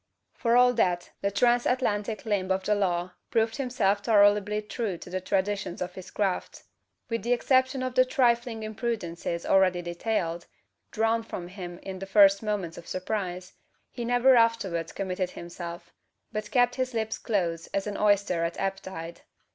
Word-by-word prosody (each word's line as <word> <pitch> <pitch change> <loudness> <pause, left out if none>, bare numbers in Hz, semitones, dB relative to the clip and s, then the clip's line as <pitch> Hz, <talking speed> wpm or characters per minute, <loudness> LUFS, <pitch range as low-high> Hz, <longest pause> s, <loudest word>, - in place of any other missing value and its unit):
For 235 -1 +2
all 250 0 +6
that, 180 -6 0
the 200 - +1
transatlantic 230 -1 +1
limb 200 -4 0
of 190 0 +1
the 210 - +2
law 180 -3 0 0.2
proved 225 0 +1
himself 230 -7 +1
tolerably 210 -1 +4
true 215 -3 -3
to 175 - -11
the 185 0 -2
traditions 195 -1 -1
of 180 0 -4
his 185 0 -9
craft. 195 -3 -2 0.4
With 230 -1 -2
the 240 +2 +1
exception 260 +2 +2
of 255 -1 -2
the 255 - +6
trifling 240 -4 +1
imprudences 210 -7 -3
already 185 -2 +3
detailed 175 -1 -2 0.4
drawn 225 +1 +1
from 180 -5 -7
him 180 -2 -8
in 190 -1 -6
the 195 - -6
first 195 0 +6
moments 205 -6 -3
of 170 - -14
surprise 185 -1 -4 0.4
he 240 - -5
never 245 +2 +4
afterwards 205 -8 +2
committed 185 -2 -2
himself; 170 0 -8 0.4
but 215 0 -4
kept 245 0 +2
his 255 -1 -2
lips 220 -1 -2
close 170 -6 -1
as 195 - -2
an 205 -1 -4
oyster 200 -5 +2
at 170 0 -3
ebb 195 0 -1
tide. 170 -3 -8
205 Hz, 165 wpm, -27 LUFS, 180-230 Hz, 0.4 s, all